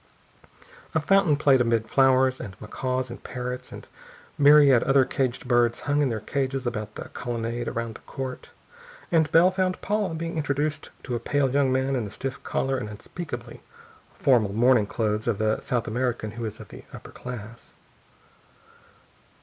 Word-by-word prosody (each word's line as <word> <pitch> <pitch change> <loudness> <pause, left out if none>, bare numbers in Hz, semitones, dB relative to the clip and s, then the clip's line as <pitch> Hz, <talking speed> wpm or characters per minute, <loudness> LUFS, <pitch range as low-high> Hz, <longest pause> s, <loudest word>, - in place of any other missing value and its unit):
A - - +4
fountain 180 -1 +3
played 140 -3 +4
amid 115 -2 +1
flowers, 130 +1 +3
and 100 -7 -9
macaws 130 +3 -3
and - - -10
parrots 125 0 -5
and - - -10 0.5
myriad 145 -4 +6
other 135 -1 +4
caged 130 -2 -2
birds 120 -2 +2
hung 145 +1 +1
in 140 - +2
their 110 -2 -2
cages 135 +3 -2
about 110 -3 -4
the - - -7
colonnade 120 0 -4
around 115 -1 -3
the - - -13
court, 130 -2 -7 0.6
and 160 -3 +3
Bell 175 +3 +6
found 185 -1 -1
Paula 205 -4 -1
being 165 0 -4
introduced 145 0 -1
to 125 - -5
a 120 - -1
pale 140 -1 0
young 140 -1 +2
man 130 +1 +1
in 125 - -1
the 105 - -6
stiff 135 +5 -5
collar 135 0 -1
and 105 - -5
unspeakably 120 +1 -8 0.5
formal 115 -7 +3
morning 120 -1 +4
clothes 105 0 -1
of 115 -4 +1
the 110 0 0
South 120 -3 -2
American 120 -2 -2
who 115 +1 -5
is 110 0 -6
of - - -11
the - - -11
upper - - -11
class. 115 -2 -9
130 Hz, 165 wpm, -25 LUFS, 115-145 Hz, 0.6 s, myriad